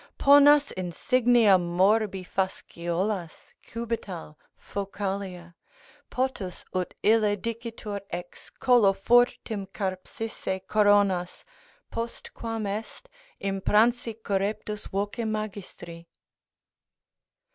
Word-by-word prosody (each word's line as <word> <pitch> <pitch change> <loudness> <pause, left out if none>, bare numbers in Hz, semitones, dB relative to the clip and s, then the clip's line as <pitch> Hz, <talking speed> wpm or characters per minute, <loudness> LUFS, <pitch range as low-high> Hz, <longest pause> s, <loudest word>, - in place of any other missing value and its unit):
ponas 285 +1 +6
insignia 225 - +3
morbi 190 +3 +2
Fasciolas, 180 -1 -3
cubital, 220 -9 -5 0.2
focalia; 195 -3 -5 0.6
potus 245 -8 -3
ut 185 -1 -2
ille 215 -1 +4
Dicitur 230 -1 -5
ex 175 0 -8
collo 240 -6 +4
furtim 220 -1 +2
carpsisse 190 +1 -4
coronas, 205 -4 +2 0.5
Postquam 230 -1 -5
est 215 - -5 0.4
impransi 215 +4 +2
correptus 205 +1 -2
voce 205 +4 -2
magistri?" 200 -6 -6
205 Hz, 70 wpm, -27 LUFS, 190-230 Hz, 0.6 s, ponas